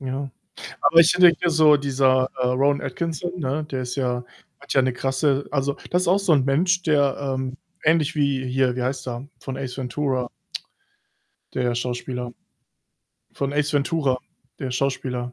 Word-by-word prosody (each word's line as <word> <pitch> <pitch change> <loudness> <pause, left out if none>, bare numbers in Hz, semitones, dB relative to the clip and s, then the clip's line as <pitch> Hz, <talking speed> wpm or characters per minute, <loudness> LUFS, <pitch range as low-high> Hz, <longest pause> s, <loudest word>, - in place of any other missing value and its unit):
Ja. 135 +1 -4 0.5
Aber 165 - +4
ich 165 - +5
hätte 180 -1 +8
hier 175 - +1
so 155 -2 +6
dieser, 130 -2 +2
äh, 125 - +2
Rowan 140 +3 +2
Atkinson, 170 +1 -3
ne, 150 +1 -2
der 130 -2 -2
ist 125 +2 -5
ja 125 -2 -1 0.3
hat 145 - -7
ja 135 - +5
'ne 130 0 +1
krasse 135 +2 0
also 140 -1 0 0.2
das 180 +1 +2
ist - - -1
auch 190 +3 +4
so 195 -4 +1
'n 140 -4 +4
Mensch, 175 +6 +2
der, 145 -4 +2
ähm, 130 -1 -3 0.3
ähnlich 160 -1 +2
wie 140 -3 0
hier, 130 -1 +1
wie 125 - -2
heißt 130 +1 -3
der? 125 +2 -5
Von 135 -1 -6
Ace 135 -1 -6
Ventura? 130 -1 -2 1.2
Der 120 -2 0
Schauspieler? 125 0 -4 1.0
Von 140 0 -3
Ace 150 0 0
Ventura, 145 -2 +1 0.4
der 130 -2 -4
Schauspieler? 125 -1 -2
135 Hz, 170 wpm, -23 LUFS, 130-150 Hz, 1.2 s, hätte